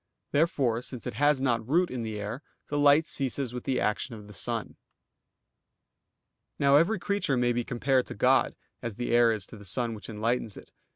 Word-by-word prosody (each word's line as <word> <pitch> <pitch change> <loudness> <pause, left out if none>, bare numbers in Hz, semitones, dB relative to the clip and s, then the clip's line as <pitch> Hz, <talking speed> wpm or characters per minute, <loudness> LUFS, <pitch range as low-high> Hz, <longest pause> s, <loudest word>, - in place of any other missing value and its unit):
Therefore, 140 -7 +1
since 125 -2 -5
it - - -4
has 145 +4 +3
not 120 -3 0
root 175 +4 +2
in 125 -2 -3
the 110 -2 -4
air, 105 +7 -5 0.3
the 145 - -1
light 145 +2 +5
ceases 135 -5 -2
with 125 - -6
the 130 -2 0
action 110 +3 -1
of 105 -2 -11
the 105 - -12
sun. 115 +2 -3 1.8
Now 140 0 +4
every 170 +9 +4
creature 200 -10 0
may 120 0 +2
be 120 0 -1
compared 125 +2 +1
to - - -7
God, - - +3 0.3
as 115 -3 -5
the 120 +2 -3
air 120 -1 +5
is 105 -5 -3
to 115 - -12
the 105 - -12
sun 115 +4 -1
which 110 +1 -9
enlightens 110 0 -2
it. - - -13
125 Hz, 195 wpm, -28 LUFS, 115-140 Hz, 1.8 s, light